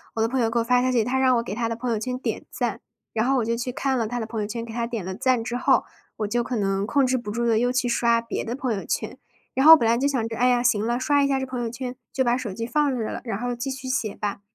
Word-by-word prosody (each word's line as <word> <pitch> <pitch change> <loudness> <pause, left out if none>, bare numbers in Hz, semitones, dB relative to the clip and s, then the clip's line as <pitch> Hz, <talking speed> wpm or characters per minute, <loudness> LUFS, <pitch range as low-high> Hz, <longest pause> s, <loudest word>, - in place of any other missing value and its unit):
我 225 - 0
的 225 - +2
朋 260 +1 -1
友 225 -1 +2
给 235 - +1
我 - - +1
发 245 +1 +3
消 255 - +2
息。 235 -3 +3
他 255 +3 -1
让 260 -1 +4
我 230 - 0
给 205 - -5
他 230 -1 -1
的 230 - -2
朋 240 +1 -3
友 225 - +1
圈 250 +2 -3
点 - - -4
赞， - - -2 0.3
然 220 0 +1
后 270 - +3
我 235 - +1
就 230 0 0
去 245 +1 -3
看 270 -1 0
了 230 -2 0
他 245 +2 -3
的 225 - -3
朋 225 -1 -4
友 205 - -2
圈， 230 +2 -4
给 230 - -8
他 235 0 -1
点 230 -5 -4
了 190 +1 -4
赞 255 +1 +1
之 240 +1 -3
后， 250 - +3 0.3
我 210 - -1
就 240 +3 0
可 245 - -3
能 195 -1 0
控 275 +2 +3
制 255 0 +1
不 210 -4 -5
住 235 +2 -1
地 230 -2 +3
又 245 - +2
去 255 0 0
刷 235 -1 +2
别 230 - -4
的 235 +2 -3
朋 255 -4 -1
友 195 - -4
圈。 - - -3 0.4
然 265 - +1
后 320 +1 +12
本 235 -7 +1
来 230 - +3
就 270 +3 +1
想 255 -5 0
着， 225 - -6
哎 250 +2 +3
呀， 245 -1 +3
行 220 -3 +2
了， 240 +1 0
刷 285 +1 +2
一 - - +3
下 270 -1 +1
这 265 - -2
朋 255 -1 -4
友 235 - -1
圈， 250 +2 -6 0.2
就 260 - +1
把 240 0 +2
手 235 -7 -5
机 230 +4 -4
放 285 +1 +1
着 225 -3 -3
了， - - -5
然 220 -4 -3
后 245 0 -2
继 255 +3 -4
续 265 0 -6
写 255 -5 -1
吧。 205 -1 -4
240 Hz, 360 characters per minute, -24 LUFS, 225-255 Hz, 0.4 s, 后